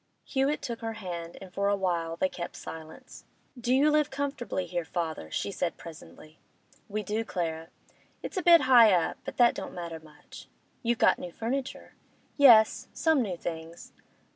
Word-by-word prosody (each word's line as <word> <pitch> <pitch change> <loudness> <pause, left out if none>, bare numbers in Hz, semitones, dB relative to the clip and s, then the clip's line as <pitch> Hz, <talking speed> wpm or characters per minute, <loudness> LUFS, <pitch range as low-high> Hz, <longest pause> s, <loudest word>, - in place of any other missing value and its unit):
Hewett 275 +2 -1
took 235 -5 -4
her 225 0 -3
hand, 175 -6 -7
and 185 -2 -11
for 200 +2 0
a 205 - +2
while 170 -4 -1
they 185 - +1
kept 175 -2 -7
silence. 160 -1 -10 0.3
'Do 245 -1 -3
you 280 +4 +4
live 300 -1 +2
comfortably 270 -8 -3
here, 175 0 -3
father?' 160 - -4
she 80 - -3
said 175 -3 -3
presently. 160 -1 -13 0.5
'We 210 +1 -3
do, 215 +3 -2
Clara. 165 -6 -4 0.6
It's - - -6
a 370 - 0
bit 340 -1 +7
high 245 -5 +7
up, 175 -2 +1
but - - -7
that 240 -1 +5
don't - - -7
matter 170 -2 -6
much.' 150 -2 -15 0.3
'You've 235 -1 0
got - - +4
new 175 - -7
furniture.' 260 +7 -4 0.4
'Yes, 235 -7 +6
some 320 -4 +2
new 190 -7 -3
things. 165 0 -7
200 Hz, 170 wpm, -28 LUFS, 170-250 Hz, 0.6 s, bit